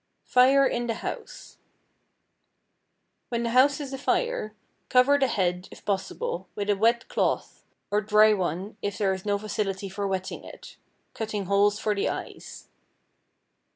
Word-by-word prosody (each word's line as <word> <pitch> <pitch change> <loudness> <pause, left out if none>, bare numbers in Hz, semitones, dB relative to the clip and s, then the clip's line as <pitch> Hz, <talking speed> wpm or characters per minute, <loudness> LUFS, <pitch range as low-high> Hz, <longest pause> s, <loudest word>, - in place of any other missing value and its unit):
=Fire 265 +2 +5
in 240 -2 -1
the 230 - -1
House.= - - -7 1.7
When 235 -1 -1
the 235 - -1
house 270 +4 +4
is 275 -2 -6
afire 270 - -1 0.3
cover 265 +3 +5
the 270 - +3
head, 180 -4 -1
if - - -14
possible, 190 -2 -3
with 205 0 0
a - - +2
wet 230 +3 +2
cloth, - - -1 0.3
or 205 +1 +2
dry 215 +1 +5
one 190 +2 -3
if 205 -1 -3
there 195 -2 +1
is 190 +2 -7
no 205 0 +2
facility 200 -2 -3
for 200 +1 -3
wetting 190 -1 -4
it, - - -12 0.4
cutting 215 -3 -3
holes 200 +2 +3
for 215 0 0
the 200 - 0
eyes. - - -7
210 Hz, 150 wpm, -26 LUFS, 195-240 Hz, 1.7 s, =Fire